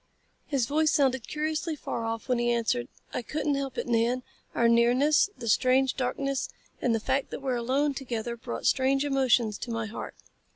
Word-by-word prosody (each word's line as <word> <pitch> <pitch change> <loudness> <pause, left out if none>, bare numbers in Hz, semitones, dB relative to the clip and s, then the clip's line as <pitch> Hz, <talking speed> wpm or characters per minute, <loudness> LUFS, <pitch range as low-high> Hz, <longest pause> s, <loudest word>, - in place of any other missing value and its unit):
His 275 -5 +1
voice 310 +5 +2
sounded 265 -5 +2
curiously 310 +1 -2
far 235 -5 -4
off 225 +1 -4
when 250 -2 +1
he 240 0 +1
answered. 225 - 0 0.3
"I - - -1
couldn't 300 +4 -1
help 275 -2 -3
it, - - -2
Nan. 240 +2 +1 0.3
Our 235 - +4
nearness, 245 +9 +4
the 235 -2 -7
strange 255 +3 +3
darkness, 275 +1 -1 0.3
and 235 -2 +2
the - - 0
fact 265 +5 -1
that - - -5
we 265 - 0
are - - +1
alone 265 +5 +1
together 240 -3 -4
brought 235 +1 -6
strange 270 +2 +3
emotions 250 -6 +2
to - - -6
my 230 -1 -2
heart. 220 +1 -7
255 Hz, 190 wpm, -28 LUFS, 235-275 Hz, 0.3 s, Our